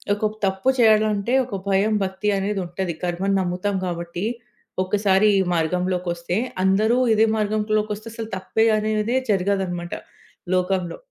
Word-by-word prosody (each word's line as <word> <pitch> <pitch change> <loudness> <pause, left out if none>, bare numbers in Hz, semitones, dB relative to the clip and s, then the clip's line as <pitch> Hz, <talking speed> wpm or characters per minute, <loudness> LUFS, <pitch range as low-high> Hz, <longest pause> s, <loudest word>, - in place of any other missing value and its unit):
ఒక 210 +1 -1
తప్పు 190 +6 0
చేయాలంటే 215 0 +3
ఒక 230 -5 -6
భయం, 200 +3 +2
భక్తి 190 +2 -2
అనేదుంటది, 190 -3 -3
కర్మను 180 +3 0
నమ్ముతాం 185 +2 -1
గాబట్టి. 170 +1 -4 0.6
ఒక్కసారి 195 +1 +2
ఈ - - +3
మార్గంలోకొస్తే 175 +1 -1 0.3
అందరూ 215 +5 +3 0.2
ఇదే 220 +1 +4
మార్గంలోకొస్తే 215 0 -1
అసలు 225 -1 -6
తప్పే 190 +4 0
అనేదే 215 +2 0
జరగదనమాట 185 -3 -1 0.6
లోకంలో. 185 -1 0
195 Hz, 115 wpm, -22 LUFS, 180-215 Hz, 0.6 s, ఇదే